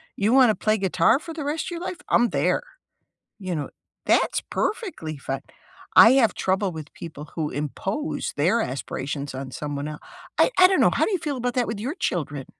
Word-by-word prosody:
You 210 +4 +1
wanna 255 -5 +6
play 215 0 +1
guitar 195 - +3
for 330 0 -8
the 310 -3 -5
rest 300 +3 -2
of - - -5
your 340 0 -5
life? 365 0 -5
I'm 240 - +4
there. - - +1 0.8
You 185 -3 -3
know? 145 - -3 0.4
That's - - +2
perfectly 345 - -3
fine. 135 0 -4 0.5
I 230 +3 +9
have 250 -5 +4
trouble 190 0 0
with 155 -2 -9
people 155 -3 -9
who 155 -3 -1
impose 185 - -3
their 185 +11 +3
aspirations 140 0 -4
on 130 0 -6
someone 145 +2 -4
el 150 -1 -7 0.4
I - - +6
I 365 0 +9
don't 380 - +2
know. - - +6
How - - +2
do - - -2
you 375 - 0
feel 290 -4 -3
about 245 0 -2
that 245 -2 +1
with 220 -2 -4
your 265 - -3
children? 145 - -2
200 Hz, 200 wpm, -24 LUFS, -, 0.8 s, I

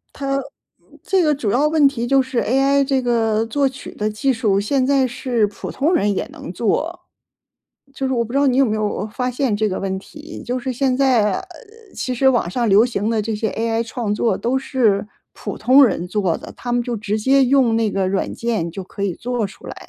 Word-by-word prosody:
它 275 -1 -2 0.7
这 380 -2 +2
个 305 -2 +3
主 250 -7 -2
要 280 +8 +2
问 305 -2 +4
题 240 -4 -4
就 275 +2 +4
是 260 -2 -2
AI 275 +3 +2
这 270 -1 +1
个 225 -3 +1
作 275 +4 +1
曲 265 +1 -10
的 210 - -1
技 240 +6 0
术， 215 -5 +1
现 260 +5 +1
在 270 -2 +3
是 245 -3 0
普 205 - -7
通 310 +7 +1
人 205 - +2
也 - - -2
能 - - -8
做。 300 - -1 0.9
就 270 - -3
是 260 - -2
我 235 -2 0
不 235 - -9
知 275 - +1
道 285 - +3
你 260 -2 +2
有 275 - +5
没 215 -3 -1
有 210 -1 -2
发 250 +4 -3
现 250 -4 0
这 215 0 0
个 185 - -3
问 190 -1 -2
题， 300 +9 -11
就 250 +1 -2
是 255 +1 -3
现 260 +1 +1
在， 245 -7 +3
呃， 375 - -12 0.5
其 255 - -3
实 265 +2 +2
网 240 -9 +2
上 235 +4 -1
流 210 +4 +5
行 220 -3 -2
的 225 -2 +1
这 220 +1 -3
些 220 +1 -1
AI 225 0 -1
创 225 -2 -3
作 225 +2 0
都 250 +3 0
是 225 -7 +1 0.3
普 - - -6
通 260 +4 +6
人 180 -6 -1
做 185 -3 0
的， - - -10
他 245 - -5
们 245 - +1
就 240 -1 -3
直 210 0 -2
接 265 +4 +3
用 255 -3 +3
那 225 -2 +1
个 195 -1 -1
软 195 0 -1
件 225 -8 -2
就 190 +3 -7
可 195 - -10
以 195 -3 0
做 240 +1 -2
出 195 - -15
来。 - - -7
240 Hz, 255 characters per minute, -20 LUFS, 210-270 Hz, 0.9 s, 通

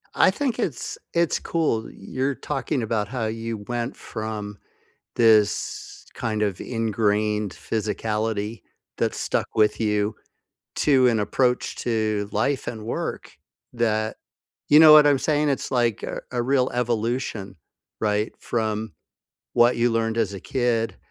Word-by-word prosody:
I - - +5
think 265 -5 -2
it's 160 - -3 0.2
it's 170 -1 +2
cool. 150 -10 -1
You're 135 +1 -3
talking 135 +1 -2
about 110 -2 -1
how 125 -1 -3
you 115 0 -4
went 120 +1 -3
from 105 -2 -6 0.6
this, 110 -3 +2
kind 110 -1 -2
of, 100 -4 -1
ingrained 105 -2 0
physicality 110 0 -2 0.4
that - - 0
stuck - - -1
with 110 0 +2
you 105 -1 +1 0.6
to 130 -4 +4
an 115 -2 +2
approach 125 +4 0
to 110 -3 -1
life 130 +6 0
and 110 -2 -5
work 115 - -4 0.4
that 110 -2 0 0.5
you 150 - +8
know 155 -1 +10
what 150 -1 +9
I'm 140 -2 +4
saying? 150 +2 +1
It's 140 - -2
like 120 -4 +1
a - - -4
a 125 -1 0
real 130 0 +2
evolution, 120 -3 -2 0.5
right, 105 0 +1
from 110 -3 -2 0.6
what 120 +1 +5
you 120 +1 +2
learned 115 0 0
as 105 -3 0
a 95 - -7
kid. 120 -2 0
115 Hz, 135 wpm, -24 LUFS, 110-125 Hz, 0.6 s, know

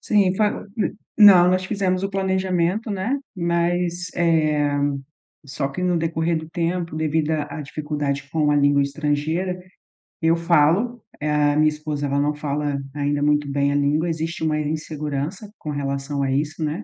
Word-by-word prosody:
Sim, 200 -4 +2
fa 210 0 0
hum, 215 - -1 0.2
não, 185 -4 +8
nós 185 0 +1
fizemos 190 -2 -1
o 195 - -1
planejamento, 190 +2 0
né, 210 +8 -1 0.2
mas, 175 0 0
eh, 155 -4 +2 0.6
só 140 0 -3
que 160 +7 -5
no 180 -1 +2
decorrer 165 +1 0
do 160 0 -8
tempo, 170 -1 -2
devido 155 0 0
à 150 0 -3
à 150 - -4
dificuldade 145 -1 -3
com 150 -2 +1
a 145 - +3
língua 140 0 +4
estrangeira, 155 +6 -1 0.6
eu 165 +1 +4
falo, 170 +8 +2 0.2
a 150 -1 +2
minha 155 0 +4
esposa 150 -1 -4
ela 140 +1 0
não 145 +1 +1
fala 145 -1 -2 0.2
ainda 145 0 -1
muito 145 -1 +2
bem 140 0 +1
a - - 0
língua, 150 +4 +1
existe 165 0 -3
uma 155 -1 +1
insegurança 155 +4 -4
com 155 - -7
relação 140 0 -3
a 135 - 0
isso, 155 +4 -1
né, 155 +8 -2
155 Hz, 165 wpm, -22 LUFS, 145-175 Hz, 0.6 s, não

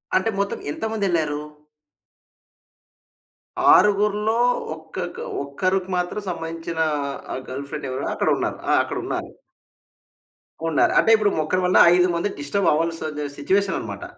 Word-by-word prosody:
అంటే 190 +4 +2
మొత్తం 200 - -1
ఎంతమందెళ్లారు? 175 -9 -1 2.3
ఆరుగురిలో 210 +2 +3 0.4
ఒక్కక్క 160 +2 -7 0.2
ఒక్కరికి 185 +6 -1
మాత్రం 180 +4 -2
సంబంధించిన 165 -1 -5 0.5
ఆ - - -3
గర్ల్ 140 +2 -6
ఫ్రెండెవరో 135 -4 -4
అక్కడున్నారు. - - 0
ఆహ్, - - +5
అక్కడున్నారు. - - -4 1.4
ఉన్నారు. 145 - +3
అంటే - - +2
ఇప్పుడు 210 -2 +2
ఒకక్కరి 160 +4 0
వల్ల 180 - +3 0.2
ఐదు 180 0 +4
మంది 185 +5 0
డిస్టబవ్వాల్సి 155 -1 0
సిట్యుయేషననమాట. 190 +6 -1
175 Hz, 95 wpm, -22 LUFS, 155-200 Hz, 2.3 s, ఆహ్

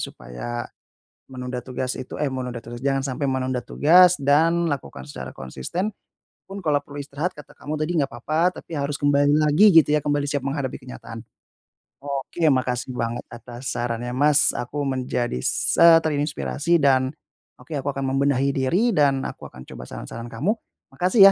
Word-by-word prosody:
supaya 65 - -6 0.7
menunda 125 -1 -5
tugas 130 0 -3
itu, 130 - -8
eh 150 - +1
menunda 125 -2 -4
tugas, 120 +1 -9
jangan 135 -1 +2
sampai 135 +2 -3
menunda 130 -2 -1
tugas, 180 +2 +5
dan 165 +5 +3
lakukan 70 - -5
secara 70 - -7
konsisten. 65 - -4 0.6
Pun 195 +1 -8
kalau 150 -4 +2
perlu 145 0 -8
istirahat 145 +6 -3
kata 150 - -14
kamu 150 - -5
tadi 155 +2 -1
nggak 140 - +2
apa-apa 155 +9 0
tapi 160 - -6
harus 140 0 -2
kembali 145 0 +4
lagi 150 +6 +4
gitu 160 -4 +7
ya, 150 - +2
kembali 145 -1 0
siap 140 -2 -2
menghadapi 140 -2 -2
kenyataan. 115 -2 -10 0.9
Oke 140 +4 -3
ya 150 - +5
makasih 130 -1 -1
banget 115 0 -3
atas 120 +1 -6
sarannya 120 0 -3
Mas, 150 +3 +4
aku 140 +4 -3
menjadi 125 - -2
se - - +1 0.2
terinspirasi, 150 +2 0
dan, 135 -3 +3 0.5
oke 130 +6 -15
aku 140 -1 -2
akan 135 -1 -2
membenahi 140 0 +2
diri 175 - +1
dan 140 -6 +2
aku - - -7
akan 65 0 -12
coba 60 - -10
saran-saran 115 - -7
kamu. 140 - 0 0.4
Makasih 180 - +1
140 Hz, 165 wpm, -23 LUFS, 125-150 Hz, 0.9 s, gitu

